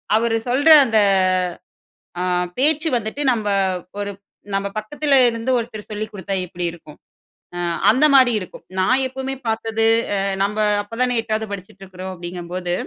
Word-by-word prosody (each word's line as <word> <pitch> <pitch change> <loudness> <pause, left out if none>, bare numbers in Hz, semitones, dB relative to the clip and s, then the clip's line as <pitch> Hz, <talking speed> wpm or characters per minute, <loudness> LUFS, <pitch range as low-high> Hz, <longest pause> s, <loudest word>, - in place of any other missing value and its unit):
அவர் 225 0 +1
சொல்ற 285 +6 +3 0.2
அந்த 220 -2 +2 1.2
அ - - -1 0.4
பேச்சு 310 +4 +3
வந்துட்டு, 225 +6 -3
நம்ம 215 -3 -2 0.5
ஒரு 205 0 -3 0.4
நம்ம 195 0 0
பக்கத்தில் 285 +6 -1 0.2
இருந்து 230 +2 -4
ஒருத்தர் 220 -3 -7
சொல்லிக் 215 +1 -5
கொடுத்தா 195 -1 -5
எப்படி 175 +1 -5
இருக்கும், 160 -3 -14 0.6
அ - - -3 0.3
அந்த 260 +7 +3
மாரி 255 -3 +6
இருக்கும். 185 - -11
நான் 255 +8 +2
எப்பவுமே 265 +1 -5
பார்த்தது, 225 0 -1 0.3
அ - - 0 0.3
நம்ம 205 +2 -2 0.3
அப்போ 215 +3 -10
தான 245 -1 0
8ஆவது 220 -1 -3
படிச்சிட்டு 190 0 -10
இருக்குறோம் 185 0 -8
அப்படிங்கும்போது 175 0 -5
220 Hz, 145 wpm, -20 LUFS, 195-250 Hz, 1.2 s, மாரி